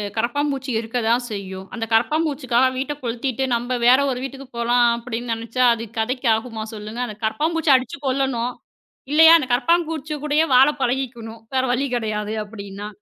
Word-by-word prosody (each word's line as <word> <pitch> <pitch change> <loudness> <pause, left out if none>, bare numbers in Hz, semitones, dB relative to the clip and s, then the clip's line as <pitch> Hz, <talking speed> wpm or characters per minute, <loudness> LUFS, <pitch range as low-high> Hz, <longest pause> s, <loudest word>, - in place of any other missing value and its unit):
கரபாம்பூச்சி 270 +3 -1
இருக்கத்தான் 230 +1 0
செய்யும். 190 -2 -6
அந்தக் 225 -1 -5
கரபாம்பூச்சிக்காக 260 -1 +2
வீட்டக் 285 +2 -4
கொளுத்திட்டு 245 +2 -2
நம்ம 245 +2 -2
வேற 255 +2 +7
ஒரு 250 - -3
வீட்டுக்குப் 270 -1 -8
போலாம் 240 +1 +3
அப்பிடின்னு 235 0 -4
நினைச்சா, 230 +3 0
அது 230 0 -5
கதைக்கு 250 +2 0
ஆகுமா 225 -1 -5
சொல்லுங்க. 215 +3 -6
அந்தக் 215 0 -10
கரப்பாம்பூச்சிய 310 +4 +2
அடிச்சு 260 +2 -6
கொல்லணும். 255 -2 0 0.6
இல்லயா, 320 +2 +8
அந்தக் 260 -5 -2
கரப்பாம்பூச்சி 315 +2 0
கூடயே 300 +2 +2
வாழப் 280 +3 +5
பழகிக்கணும். 240 -3 -3
வேற 260 - +2
வழி 270 +3 0
கிடையாது 215 -2 -2
அப்பிடின்னா. 200 -1 -8
245 Hz, 145 wpm, -21 LUFS, 225-275 Hz, 0.6 s, இல்லயா